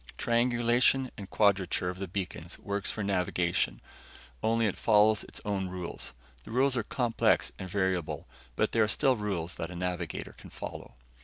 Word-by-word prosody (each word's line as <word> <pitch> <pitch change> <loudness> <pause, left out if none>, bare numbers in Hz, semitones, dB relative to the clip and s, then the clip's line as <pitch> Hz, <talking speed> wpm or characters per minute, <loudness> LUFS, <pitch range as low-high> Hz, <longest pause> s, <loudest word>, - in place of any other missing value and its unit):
Triangulation 120 +2 +3
and 100 -2 -8
quadrature 95 -3 +2
of 90 - -10
the 95 - -3
beacons 90 -2 -5
works 100 -1 -3
for 110 - -3
navigation 90 -9 0 0.6
only 115 +1 +2
it 100 - 0
follows 110 -1 +4
its - - -6
own 100 -2 -1
rules. 90 -7 -5 0.3
The - - -12
rules 130 +3 +3
are 120 - +2
complex 120 0 +1
and 95 - -5
variable, 95 -3 -1 0.3
but - - +1
they 115 - +1
are 110 - +5
still 130 +4 +3
rules 95 -6 -2
that 80 - -3
a 90 - -8
navigator 90 0 -3
can - - -12
follow. - - -8
100 Hz, 165 wpm, -30 LUFS, 90-115 Hz, 0.6 s, are